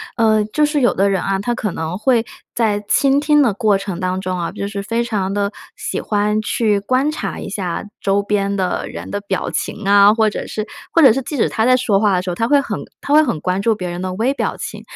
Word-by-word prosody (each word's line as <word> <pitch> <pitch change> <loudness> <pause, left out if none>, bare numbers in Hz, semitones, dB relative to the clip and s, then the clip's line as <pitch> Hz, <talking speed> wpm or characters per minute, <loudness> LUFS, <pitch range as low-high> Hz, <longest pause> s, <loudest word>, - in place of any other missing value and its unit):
呃， 220 -2 +3
就 300 +8 +1
是 295 0 0
有 245 - +3
的 200 +2 +2
人 195 -2 0
啊， 195 0 0
他 240 +5 -1
可 215 -6 -3
能 160 +2 -4
会 230 +1 +2 0.3
在 215 -3 +1
倾 275 0 +3
听 295 0 +3
的 240 -7 +3
过 210 0 +2
程 195 -3 -5
当 185 0 -2
中 185 -1 -3
啊， 170 - -3
就 200 -1 -4
是 200 -1 -4
非 230 +4 -1
常 200 -5 -2
地 200 0 -1 0.2
喜 - - -4
欢 210 0 0
去 215 -1 +1
观 255 +8 +1
察 310 - -4
一 - - -6
下 185 -4 -3 0.2
周 200 0 +1
边 200 -1 0
的 185 -2 -1
人 - - -8
的 205 - -2
表 200 -2 -3
情 210 -1 -4
啊， 200 +1 +6
或 220 -1 +2
者 - - -5
是 215 - -4 0.3
或 335 - +5
者 270 -6 +8
是 270 - 0
即 295 - -5
使 255 - +1
他 220 - 0
在 255 +1 +5
说 235 -6 +2
话 205 -2 +3
的 180 - +1
时 185 - -5
候， 175 - -2
他 230 +5 0
会 285 +2 +4
很 - - -4 0.2
他 285 - -1
会 305 - +7
很 235 - -1
关 185 +3 -1
注 225 +2 +2
别 180 -3 -5
人 175 +1 -5
的 185 0 -3
微 230 +8 0
表 - - -2
情。 - - -7
210 Hz, 275 characters per minute, -18 LUFS, 195-235 Hz, 0.3 s, 者